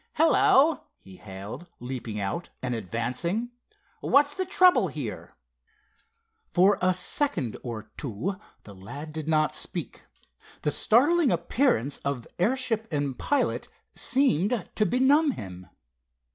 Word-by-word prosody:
"Hello!" 315 Hz, -1 st, +4 dB
he 95 Hz, -1 st, -15 dB
hailed, 100 Hz, -, -9 dB
leaping 120 Hz, -4 st, -5 dB
out, 100 Hz, -, -3 dB
and 125 Hz, -1 st, -1 dB
advancing. 125 Hz, -, -2 dB, 0.5 s
"What's 290 Hz, +1 st, +3 dB
the 375 Hz, +2 st, -3 dB
trouble 360 Hz, -, +5 dB
here?" 140 Hz, -, -7 dB, 1.2 s
For 190 Hz, +3 st, +4 dB
a 185 Hz, 0 st, +3 dB
second 180 Hz, -, 0 dB
or 110 Hz, -3 st, -7 dB
two 150 Hz, -, -3 dB, 0.3 s
the 100 Hz, -, -12 dB
lad 140 Hz, +12 st, -9 dB
did 155 Hz, -1 st, -5 dB
not 155 Hz, -1 st, +2 dB
speak. -, -, -5 dB, 0.6 s
The 150 Hz, -, +1 dB
startling 285 Hz, -, +3 dB
appearance 170 Hz, -, +1 dB
of 140 Hz, -4 st, -3 dB
airship 225 Hz, +2 st, 0 dB
and 145 Hz, -3 st, -1 dB
pilot 290 Hz, -, -1 dB, 0.3 s
seemed 240 Hz, -, +1 dB
to 215 Hz, -, +1 dB
benumb 275 Hz, -, +3 dB
him. 90 Hz, -, -9 dB
170 Hz, 115 wpm, -26 LUFS, -, 1.2 s, trouble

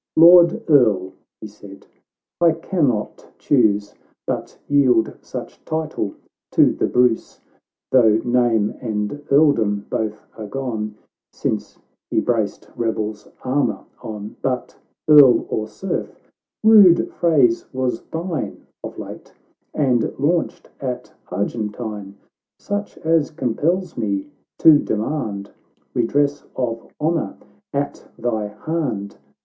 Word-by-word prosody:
'" -, -, -69 dB
Lord 175 Hz, 0 st, +7 dB
Earl," 105 Hz, -, +3 dB, 0.3 s
he -, -, -7 dB
said, 100 Hz, -2 st, -13 dB, 0.2 s
— -, -, -69 dB
" -, -, -69 dB
I 170 Hz, -2 st, +5 dB
cannot 155 Hz, -, -1 dB
chuse 105 Hz, -6 st, +2 dB, 0.3 s
But -, -, -4 dB
yield 130 Hz, -6 st, +3 dB
such -, -, -8 dB
title 155 Hz, -10 st, -3 dB, 0.4 s
to -, -, +5 dB
the -, -, 0 dB
Bruce, 125 Hz, -2 st, +1 dB, 0.5 s
Though 110 Hz, -4 st, +5 dB
name 120 Hz, -4 st, +2 dB
and 110 Hz, +4 st, -3 dB
earldom 140 Hz, -9 st, +3 dB
both 110 Hz, -1 st, -3 dB
are 110 Hz, -2 st, -7 dB
gone, 110 Hz, -3 st, -4 dB, 0.4 s
Since -, -, -3 dB, 0.3 s
he -, -, +1 dB
braced 110 Hz, -4 st, -1 dB
rebel's 110 Hz, -2 st, -3 dB, 0.2 s
armour 135 Hz, +3 st, 0 dB, 0.2 s
on 105 Hz, -1 st, -7 dB
— -, -, -38 dB
But, 125 Hz, -2 st, -2 dB, 0.3 s
Earl 145 Hz, -5 st, +7 dB
or 110 Hz, 0 st, -2 dB
Serf 190 Hz, -, -5 dB, 0.3 s
— -, -, -69 dB
rude 205 Hz, -6 st, +6 dB
phrase 140 Hz, -9 st, +2 dB
was 130 Hz, -3 st, -2 dB
thine 165 Hz, -1 st, -4 dB, 0.2 s
Of -, -, -7 dB
late, -, -, -9 dB, 0.4 s
and 125 Hz, -6 st, +1 dB
launched 160 Hz, +5 st, -1 dB
at 125 Hz, -2 st, -5 dB, 0.2 s
Argentine; 105 Hz, 0 st, -4 dB, 0.4 s
Such 205 Hz, +1 st, -4 dB
as 160 Hz, -2 st, +1 dB
compels 165 Hz, +6 st, -1 dB
me 100 Hz, +4 st, -2 dB, 0.3 s
to 155 Hz, -3 st, +7 dB
demand 110 Hz, -4 st, -3 dB, 0.4 s
Redress 140 Hz, +4 st, +1 dB
of 115 Hz, -3 st, -3 dB
honour 160 Hz, +1 st, -1 dB, 0.3 s
at 140 Hz, 0 st, -3 dB
thy 110 Hz, -3 st, -1 dB
hand. 105 Hz, -3 st, -4 dB
125 Hz, 120 wpm, -21 LUFS, 105-150 Hz, 0.5 s, Lord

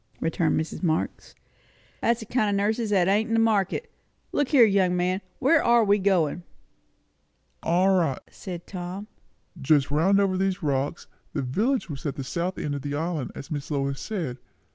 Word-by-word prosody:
returned 165 Hz, 0 st, +1 dB
Mrs. 160 Hz, -, -4 dB
Marx. 160 Hz, -3 st, -2 dB, 0.7 s
"That's 235 Hz, 0 st, +1 dB
a -, -, -11 dB
kind 215 Hz, -2 st, +1 dB
o' 200 Hz, -, +1 dB
nurses 220 Hz, +1 st, 0 dB
that 190 Hz, -4 st, +3 dB
ain't 210 Hz, +3 st, +2 dB
in 225 Hz, -, 0 dB
the -, -, +3 dB
market. 225 Hz, -, +1 dB, 0.4 s
Look 290 Hz, -, +1 dB
here, 255 Hz, -5 st, +6 dB
young 190 Hz, -4 st, +2 dB
man 180 Hz, +2 st, 0 dB, 0.2 s
where 310 Hz, +4 st, +3 dB
are 235 Hz, -1 st, +5 dB
we 205 Hz, 0 st, +3 dB
going?" 180 Hz, -4 st, +1 dB, 1.2 s
"All 185 Hz, +3 st, +3 dB
right," 165 Hz, -7 st, +1 dB
said 175 Hz, -3 st, -8 dB
Tom. 185 Hz, +2 st, -6 dB, 0.6 s
"Just 140 Hz, 0 st, +3 dB
round 185 Hz, +7 st, +3 dB
over 195 Hz, -2 st, +2 dB
these 190 Hz, -1 st, -1 dB
rocks. 140 Hz, +2 st, -1 dB, 0.3 s
The -, -, -1 dB
village 220 Hz, -, 0 dB
was 145 Hz, -5 st, -7 dB
at 140 Hz, -, -3 dB
the 135 Hz, -, -5 dB
south 170 Hz, +7 st, -3 dB
end 145 Hz, -, -3 dB
of 140 Hz, -, -3 dB
the 145 Hz, +1 st, -3 dB
island, 160 Hz, -2 st, -2 dB
as 135 Hz, -, -9 dB
Miss 145 Hz, -2 st, -4 dB
Lois 140 Hz, -2 st, -2 dB
said. 165 Hz, -, -4 dB
185 Hz, 180 wpm, -26 LUFS, 155-205 Hz, 1.2 s, here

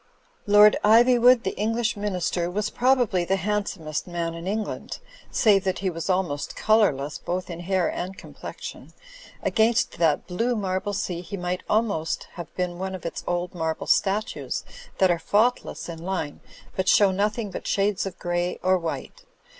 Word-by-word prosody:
Lord 210 Hz, +1 st, +7 dB
Ivywood, 240 Hz, +2 st, +6 dB
the 190 Hz, -, -2 dB
English 225 Hz, +2 st, 0 dB
Minister, 180 Hz, -4 st, -1 dB
was 210 Hz, +3 st, -2 dB
probably 245 Hz, -8 st, +2 dB
the 190 Hz, +3 st, +1 dB
handsomest 190 Hz, -6 st, -2 dB
man 170 Hz, -1 st, -3 dB
in 165 Hz, +2 st, -7 dB
England, 215 Hz, +2 st, -3 dB, 0.3 s
save 200 Hz, -4 st, +4 dB
that 190 Hz, -1 st, 0 dB
he 190 Hz, -1 st, -1 dB
was 165 Hz, +2 st, -5 dB
almost 180 Hz, -6 st, -1 dB
colourless 155 Hz, -11 st, +2 dB
both 180 Hz, +1 st, -3 dB
in 170 Hz, -, -6 dB
hair 185 Hz, 0 st, +1 dB
and 190 Hz, +2 st, -4 dB
complexion. -, -, -9 dB, 0.5 s
Against 220 Hz, -3 st, +2 dB
that 160 Hz, -3 st, +2 dB
blue 230 Hz, +7 st, -1 dB
marble 195 Hz, -1 st, -2 dB
sea 180 Hz, -3 st, -2 dB
he 200 Hz, +3 st, -6 dB
might 180 Hz, 0 st, -2 dB
almost 205 Hz, -8 st, 0 dB
have 175 Hz, -2 st, -8 dB
been 180 Hz, -1 st, -2 dB
one 190 Hz, 0 st, -3 dB
of 180 Hz, -, -10 dB
its 170 Hz, -, -4 dB
old 175 Hz, 0 st, -1 dB
marble 160 Hz, -2 st, -2 dB
statues 205 Hz, +2 st, 0 dB, 0.3 s
that 190 Hz, -2 st, +4 dB
are 170 Hz, -, 0 dB
faultless 220 Hz, +8 st, +1 dB
in 165 Hz, -1 st, -7 dB
line 180 Hz, -6 st, -3 dB, 0.4 s
but 190 Hz, 0 st, +1 dB
show 200 Hz, -2 st, +5 dB
nothing 210 Hz, +2 st, -1 dB
but -, -, -6 dB
shades 200 Hz, -1 st, +1 dB
of 190 Hz, -, -8 dB
grey 175 Hz, 0 st, -1 dB
or 185 Hz, 0 st, +3 dB
white. 175 Hz, -, -6 dB
190 Hz, 160 wpm, -25 LUFS, 175-210 Hz, 0.5 s, Lord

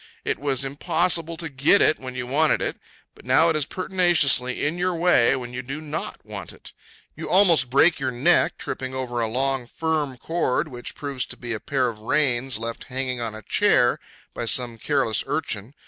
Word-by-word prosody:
It -, -, -1 dB
was 135 Hz, -2 st, -1 dB
impossible 165 Hz, +4 st, +1 dB
to 165 Hz, -, -3 dB
get 140 Hz, +7 st, +3 dB
it 155 Hz, -, +3 dB
when 130 Hz, -1 st, -8 dB
you 125 Hz, -1 st, -4 dB
wanted 150 Hz, +5 st, +2 dB
it; -, -, -3 dB, 0.3 s
but -, -, -18 dB
now 130 Hz, +7 st, +4 dB
it 160 Hz, -, +1 dB
is 150 Hz, -2 st, -1 dB
pertinaciously 175 Hz, -9 st, +2 dB
in 160 Hz, +4 st, -2 dB
your 180 Hz, 0 st, 0 dB
way 165 Hz, -8 st, +4 dB
when 125 Hz, -1 st, -6 dB
you 125 Hz, -, -4 dB
do 135 Hz, +4 st, -6 dB
not 155 Hz, +1 st, -6 dB
want -, -, -8 dB
it. -, -, -13 dB, 0.4 s
You -, -, -7 dB
almost 170 Hz, -9 st, +4 dB
break 150 Hz, +6 st, +4 dB
your 135 Hz, -1 st, -1 dB
neck 120 Hz, -1 st, +2 dB
tripping 130 Hz, 0 st, -5 dB
over 125 Hz, -2 st, -3 dB
a 115 Hz, -, +1 dB
long, 130 Hz, +1 st, -1 dB
firm 150 Hz, -2 st, -2 dB
cord, 160 Hz, +1 st, -1 dB
which 120 Hz, -2 st, -8 dB
proves 140 Hz, -3 st, -4 dB
to -, -, -7 dB
be 120 Hz, -1 st, -5 dB
a 110 Hz, -, -3 dB
pair 130 Hz, 0 st, 0 dB
of 115 Hz, -3 st, -5 dB
reins 130 Hz, -1 st, 0 dB
left 115 Hz, +1 st, -6 dB
hanging 130 Hz, -1 st, -3 dB
on 115 Hz, -2 st, -4 dB
a 110 Hz, -, -10 dB
chair -, -, +3 dB, 0.3 s
by -, -, -4 dB
some 115 Hz, 0 st, 0 dB
careless 135 Hz, -4 st, +1 dB
urchin. 130 Hz, -5 st, -3 dB
135 Hz, 195 wpm, -23 LUFS, 125-155 Hz, 0.4 s, now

